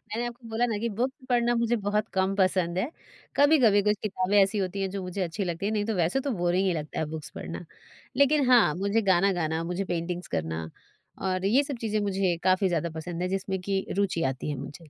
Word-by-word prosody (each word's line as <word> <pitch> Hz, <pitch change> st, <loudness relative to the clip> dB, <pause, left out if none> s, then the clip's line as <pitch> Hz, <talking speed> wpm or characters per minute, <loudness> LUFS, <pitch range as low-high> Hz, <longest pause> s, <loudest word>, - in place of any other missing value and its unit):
मैंने 235 Hz, +2 st, -1 dB
आपको 240 Hz, 0 st, -10 dB
बोला 225 Hz, +2 st, +1 dB
ना 225 Hz, -3 st, -1 dB
कि 235 Hz, -, -1 dB
बुक 255 Hz, +3 st, +1 dB, 0.2 s
पढ़ना 240 Hz, -1 st, +3 dB
मुझे 235 Hz, 0 st, +1 dB
बहुत 210 Hz, +1 st, +1 dB
कम 190 Hz, +1 st, +1 dB
पसंद 185 Hz, -2 st, +1 dB
है। 240 Hz, +9 st, 0 dB, 0.5 s
कभी-कभी 260 Hz, -9 st, +5 dB
कुछ 210 Hz, 0 st, +3 dB
किताबें 195 Hz, 0 st, 0 dB
ऐसी 195 Hz, +2 st, +3 dB
होती 195 Hz, 0 st, -2 dB
हैं 190 Hz, -, -1 dB
जो 195 Hz, 0 st, -4 dB
मुझे 185 Hz, +2 st, -4 dB
अच्छी 180 Hz, +3 st, -2 dB
लगती 175 Hz, +1 st, -3 dB
हैं, 210 Hz, -, 0 dB
नहीं 205 Hz, -1 st, 0 dB
तो 220 Hz, -2 st, -1 dB
वैसे 175 Hz, +9 st, +1 dB
तो -, -, +1 dB
बोरिंग 175 Hz, +2 st, +2 dB
ही 180 Hz, -, +2 dB
लगता 155 Hz, -1 st, -4 dB
है 160 Hz, -, 0 dB
बुक्स 155 Hz, -2 st, -6 dB
पढ़ना। -, -, -6 dB, 0.5 s
लेकिन 280 Hz, -2 st, +4 dB
हाँ, 240 Hz, -11 st, +6 dB
मुझे 200 Hz, +4 st, +1 dB
गाना 195 Hz, +3 st, +4 dB
गाना, 160 Hz, +1 st, -1 dB
मुझे 185 Hz, +3 st, -1 dB
पेंटिंग्स 175 Hz, +1 st, -3 dB
करना, 80 Hz, 0 st, -3 dB, 0.5 s
और 185 Hz, 0 st, -1 dB
ये 250 Hz, +8 st, +4 dB
सब 275 Hz, -3 st, -5 dB
चीज़ें 215 Hz, -2 st, 0 dB
मुझे 190 Hz, -2 st, +1 dB
काफ़ी 185 Hz, +1 st, +3 dB
ज़्यादा 170 Hz, -1 st, -1 dB
पसंद 175 Hz, +1 st, -5 dB
हैं 180 Hz, -, -1 dB
जिसमें 190 Hz, 0 st, -2 dB
कि 195 Hz, -1 st, 0 dB
रुचि 185 Hz, -4 st, +1 dB
आती 130 Hz, -, -6 dB
है 145 Hz, -, -2 dB
मुझे। 145 Hz, +4 st, -9 dB
195 Hz, 225 wpm, -27 LUFS, 175-220 Hz, 0.5 s, हाँ